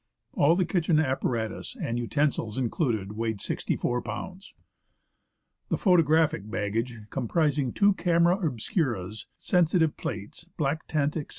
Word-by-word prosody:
All 155 Hz, +4 st, +4 dB
the 185 Hz, 0 st, +2 dB
kitchen 165 Hz, -2 st, +2 dB
apparatus, 125 Hz, -6 st, -2 dB
and 120 Hz, +1 st, -2 dB
utensils 120 Hz, -3 st, 0 dB
included, 115 Hz, -, -1 dB
weighed 110 Hz, -1 st, -2 dB
64 120 Hz, +4 st, -1 dB
lbs. 190 Hz, +1 st, -6 dB, 1.2 s
The -, -, +1 dB
photographic 160 Hz, -, +3 dB
baggage, 115 Hz, +4 st, -2 dB
comprising 140 Hz, +1 st, 0 dB
two 205 Hz, 0 st, +4 dB
camera 170 Hz, 0 st, +3 dB
obscuras, 120 Hz, -, -2 dB
sensitive 170 Hz, -3 st, +2 dB
plates, 105 Hz, +9 st, -6 dB
black 150 Hz, 0 st, -1 dB
tent, 150 Hz, -1 st, 0 dB
etc. 150 Hz, -, -5 dB
145 Hz, 115 wpm, -27 LUFS, 115-165 Hz, 1.2 s, All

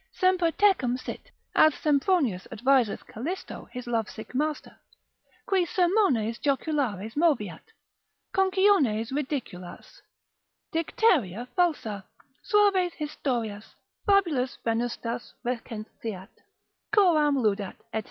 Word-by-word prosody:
Semper 370 Hz, -2 st, +2 dB
tecum 320 Hz, -10 st, +2 dB
sit, -, -, -8 dB, 0.2 s
(as 310 Hz, -1 st, +5 dB
Sempronius 285 Hz, -, +1 dB
adviseth 255 Hz, -1 st, +2 dB
Calisto 315 Hz, -, -6 dB
his 250 Hz, 0 st, -7 dB
lovesick 225 Hz, -1 st, -3 dB
master) 300 Hz, +3 st, -2 dB, 0.7 s
qui 380 Hz, -2 st, +2 dB
sermones 345 Hz, -, +2 dB
joculares 265 Hz, -, -1 dB
moveat, 290 Hz, -, +1 dB, 0.7 s
conciones 380 Hz, -, +3 dB
ridiculas, 260 Hz, -, -5 dB, 0.7 s
dicteria 295 Hz, -, +1 dB
falsa, 295 Hz, -, 0 dB, 0.4 s
suaves 400 Hz, -5 st, +3 dB
historias, 240 Hz, -8 st, -4 dB, 0.3 s
fabulas 335 Hz, -11 st, +2 dB
venustas 235 Hz, +1 st, -2 dB
recenseat, 220 Hz, -4 st, -5 dB, 0.6 s
coram 330 Hz, -8 st, +4 dB
ludat, 205 Hz, -5 st, 0 dB, 0.2 s
&c. 220 Hz, -, 0 dB
270 Hz, 85 wpm, -27 LUFS, 225-350 Hz, 0.7 s, as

